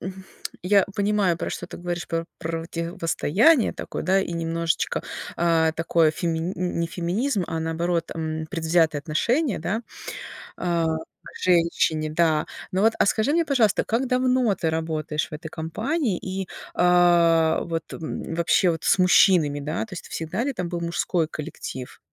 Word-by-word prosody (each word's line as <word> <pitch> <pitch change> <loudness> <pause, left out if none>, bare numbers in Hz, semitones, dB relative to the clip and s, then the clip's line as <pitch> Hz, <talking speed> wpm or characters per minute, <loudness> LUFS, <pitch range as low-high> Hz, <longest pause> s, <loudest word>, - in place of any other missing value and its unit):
м, 190 +1 -7 0.4
я 200 +1 +4
понимаю, 200 -4 +2
про - - -4
что 175 - -5
ты 175 - -9
говоришь, 175 0 -4
про 165 0 -1
противостояние 170 - +1
такое, - - -6
да, 190 +1 +3
и 185 - -3
немножечко, 165 -1 -1 0.3
а, 165 -1 +3
такое 165 -1 +2
фемини 165 +2 -2
не 170 -1 -1
феминизм, 185 +6 -1
а 165 - -3
наоборот, 165 +1 -1
м, 160 -1 -3
предвзятое 160 -2 +2
отношение, 230 - 0
да, 200 +8 -2 0.7
а, 170 -2 0 0.4
к - - -12
женщине, 165 -3 +2
да. 155 -1 +2 0.3
Но 190 +1 +1
вот, 225 +1 +4
а, - - +4
скажи 220 +8 +2
мне, 335 +1 +3
пожалуйста, 240 -9 +2
как 240 +4 0
давно 255 -3 +2
ты 165 -4 -1
работаешь 155 -1 -2
в - - -7
этой 160 +2 -7
компании 215 - -2
и, 190 0 -5 0.3
а, 170 -2 +4
вот, 165 -1 -4
м, 160 0 -5
вообще 170 +2 +3
вот 165 -1 -4
с - - +4
мужчинами, 175 -5 +5
да, 150 +8 -2
то 215 - -20
есть 175 - -8
всегда 175 +8 -3
ли 280 - -1
там 180 -7 -4
был 175 -1 -3
мужской 170 -1 0
коллектив? 150 -5 -7
170 Hz, 155 wpm, -24 LUFS, 160-195 Hz, 0.7 s, мужчинами